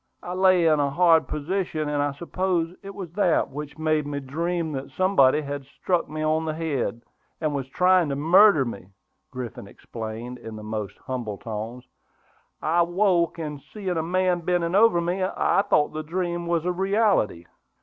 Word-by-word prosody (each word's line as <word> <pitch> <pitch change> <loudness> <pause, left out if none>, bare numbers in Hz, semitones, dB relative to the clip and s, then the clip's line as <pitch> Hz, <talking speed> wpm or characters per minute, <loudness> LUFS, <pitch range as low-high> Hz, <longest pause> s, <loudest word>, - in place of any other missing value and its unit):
I 180 - -5
lay 185 -2 +4
in 155 -2 +4
a 140 -1 +2
hard 165 +1 +4
position, 155 0 -2
and 145 -1 0
I 145 0 0
suppose 175 +1 -2
it 195 -1 -9
was 185 -5 -7
that 180 -2 +1
which 150 +2 -7
made 155 -2 0
me 145 -1 -3
dream 165 +4 -2
that 135 -1 -5
somebody 155 -7 +3
had 145 -1 -5
struck 175 +5 -2
me 155 0 -4
on 155 +1 +1
the 155 -1 -2
head, 140 -7 -2 0.4
and 155 -2 -1
was 135 -2 -3
trying 180 +2 +3
to 140 - -1
murder 165 +1 +5
me," 100 -6 -7 0.4
Griffin 125 -5 -7
explained, 115 +4 -7
in 110 -1 -8
the 105 - -9
most 105 -2 -5
humble 120 -6 -4
tones. 115 +3 -6 0.8
"I 165 +3 +3
woke, 175 -1 +2
and 150 -3 -5
seeing 190 +7 -7
a 160 - 0
man 180 +2 +1
bending 170 0 0
over 205 -3 +5
me, 175 +3 -1
I 185 - +2
thought 150 - +3
the 155 - -3
dream 175 +1 -3
was 170 -1 0
a 180 - +1
reality." 190 - +1
160 Hz, 180 wpm, -25 LUFS, 140-180 Hz, 0.8 s, murder